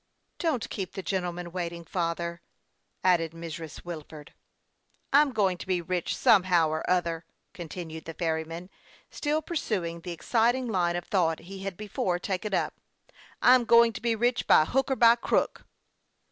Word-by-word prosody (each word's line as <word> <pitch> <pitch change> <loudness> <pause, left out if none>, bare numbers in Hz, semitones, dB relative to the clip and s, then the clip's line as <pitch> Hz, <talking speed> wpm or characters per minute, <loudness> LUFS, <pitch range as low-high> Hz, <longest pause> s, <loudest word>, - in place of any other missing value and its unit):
" - - -48
Don't 305 -9 0
keep 190 -4 -4
the 195 -1 -5
gentleman 180 -2 -3
waiting, 170 -1 -4
father," 170 0 -2 0.6
add 180 -2 +4
ed 165 -1 -5
Mrs. 165 -1 -8
Wilford. 155 -3 -9 0.4
" - - -25
I'm 290 0 +6
going 195 -6 +1
to - - -8
be 185 -2 +1
rich, 175 0 -2
somehow 180 -5 +4
or 155 0 -2
other^" 170 -2 +1 0.3
con 175 -5 -8
tinued 160 -2 -7
the 165 - -7
ferryman, 165 +1 -3 0.4
still 305 +1 -1
pursuing 190 - -2
the 180 - -7
exciting 235 +8 +1
line 175 -5 +1
of 175 - -3
thought 165 -5 +1
he 190 +3 -9
had 195 -2 -5
before 195 -4 -1
taken 195 +3 -3
up. - - 0 0.3
" - - -25
I'm 250 0 +7
going 235 0 +5
to - - -7
be 230 -1 +1
rich, 240 +2 0
by 155 - +6
hook 270 - 0
or 265 - +2
by 235 -1 +6
crook." - - -1
180 Hz, 175 wpm, -28 LUFS, 170-220 Hz, 0.6 s, I'm